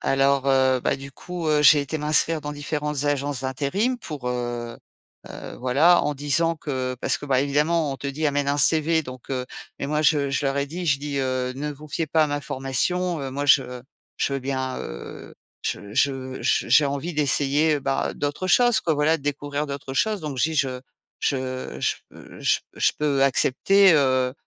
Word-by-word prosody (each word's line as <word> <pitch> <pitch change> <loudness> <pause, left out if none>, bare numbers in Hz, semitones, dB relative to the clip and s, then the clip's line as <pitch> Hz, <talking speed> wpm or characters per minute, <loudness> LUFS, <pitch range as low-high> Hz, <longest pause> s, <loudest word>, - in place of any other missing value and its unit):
Alors 135 0 +1
heu 130 -1 +3
bah, - - 0
du 140 +1 -9
coup, 175 +3 -6
heu, 150 -1 +3
j'ai 150 +1 +7
été 145 +3 -4
m'inscrire 155 +2 +2
dans 150 0 -5
différentes 150 -1 -3
agences 145 -2 -1
d'intérim 145 - -1
pour, 145 - -6
heu 120 -1 -4 0.5
heu, - - -9
voilà. 140 +8 +4
En 150 - -1
disant 145 +4 +1
que 130 -5 -4
parce - - +1
que 145 - -9
bah, 130 -2 +2
évidemment, 150 +3 +1
on 135 - -4
te 140 - -7
dit: 140 +3 -3
«Amène 145 0 -1
un 140 +1 +1
CV» 160 +2 +4
donc 130 -3 -11
heu-mais 130 +1 -6
moi 150 +1 0
je 145 -2 +2
je 135 +1 -1
leur 135 +1 -1
ai 140 - -1
dit, 175 +5 -6
je 140 -3 +2
dis, 145 -1 -4
heu: 130 -1 -1
«Ne 150 +1 -4
vous 150 +2 -13
fiez 160 +2 -2
pas 160 +2 +2
à 155 - +2
ma 145 0 -2
formation, 160 +7 -1
heu, 135 -1 -5
moi, 145 +2 -3
je 125 -3 +3 0.4
je - - -1
veux - - -1
bien, 130 -1 -3
heu, - - -9 0.3
je 100 0 -4
je 130 0 -1
je - - +1
j'ai 150 - +5
envie 140 +5 -4
d'essayer 150 +1 +2
bah, 135 0 -1
d'autres 145 +5 -3
choses, 240 +4 +4
quoi, 160 - 0
voilà, 150 +2 +2
découvrir 145 0 -3
d'autres 140 -1 -6
choses.» 210 +8 0
donc 150 -4 -5
je 150 +6 +2
dis: - - -5
«Je 130 -4 0 0.4
je 140 - +1 0.4
je - - 0
p - - -14
je - - +2
p - - -41
je - - +2
peux 140 -2 +1
accepter, 190 +9 +4
heu, 130 -3 +2
140 Hz, 200 wpm, -23 LUFS, 135-155 Hz, 0.5 s, j'ai